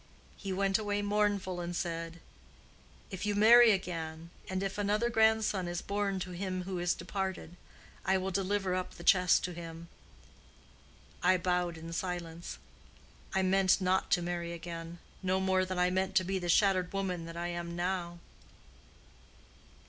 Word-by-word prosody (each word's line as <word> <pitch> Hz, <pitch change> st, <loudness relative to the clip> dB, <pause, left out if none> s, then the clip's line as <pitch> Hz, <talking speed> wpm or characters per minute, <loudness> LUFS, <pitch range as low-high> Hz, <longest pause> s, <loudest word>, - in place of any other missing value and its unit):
He 195 Hz, -, -6 dB
went 195 Hz, +1 st, +1 dB
away 205 Hz, -1 st, -1 dB
mournful, 205 Hz, -3 st, 0 dB
and 175 Hz, 0 st, -4 dB
said, 165 Hz, -1 st, -4 dB, 0.9 s
'If 190 Hz, 0 st, -5 dB
you 210 Hz, 0 st, 0 dB
marry 230 Hz, +3 st, +8 dB
again, 165 Hz, -4 st, -2 dB, 0.2 s
and 190 Hz, 0 st, -2 dB
if 195 Hz, +1 st, -3 dB
another 210 Hz, +4 st, +1 dB
grandson 220 Hz, -4 st, +3 dB
is 175 Hz, 0 st, -3 dB
born 200 Hz, -1 st, -1 dB
to 180 Hz, -, -5 dB
him 185 Hz, 0 st, -3 dB
who 185 Hz, -1 st, -4 dB
is 175 Hz, 0 st, +1 dB
departed, 190 Hz, -3 st, -4 dB, 0.5 s
I 190 Hz, +1 st, +2 dB
will 190 Hz, +1 st, -2 dB
deliver 195 Hz, 0 st, 0 dB
up 185 Hz, 0 st, -3 dB
the 170 Hz, -, -10 dB
chest 180 Hz, 0 st, +5 dB
to 180 Hz, -, -3 dB
him.' 165 Hz, 0 st, -8 dB, 1.3 s
I 185 Hz, +1 st, +4 dB
bowed 180 Hz, -1 st, 0 dB
in 165 Hz, +1 st, -8 dB
silence. 170 Hz, -2 st, -4 dB, 0.8 s
I 190 Hz, -, +3 dB
meant 190 Hz, 0 st, +4 dB
not 185 Hz, 0 st, +1 dB
to 175 Hz, -, +2 dB
marry 170 Hz, -1 st, -3 dB
again—no 170 Hz, +2 st, -4 dB
more 190 Hz, 0 st, +2 dB
than 185 Hz, 0 st, -4 dB
I 180 Hz, 0 st, +3 dB
meant 190 Hz, +1 st, -1 dB
to 185 Hz, -, +5 dB
be 190 Hz, +1 st, -1 dB
the 175 Hz, -1 st, -4 dB
shattered 185 Hz, -1 st, +3 dB
woman 185 Hz, -4 st, -2 dB
that 165 Hz, 0 st, -8 dB
I 175 Hz, 0 st, -2 dB
am 170 Hz, 0 st, -4 dB
now." 175 Hz, -1 st, -2 dB
185 Hz, 155 wpm, -31 LUFS, 175-195 Hz, 1.3 s, marry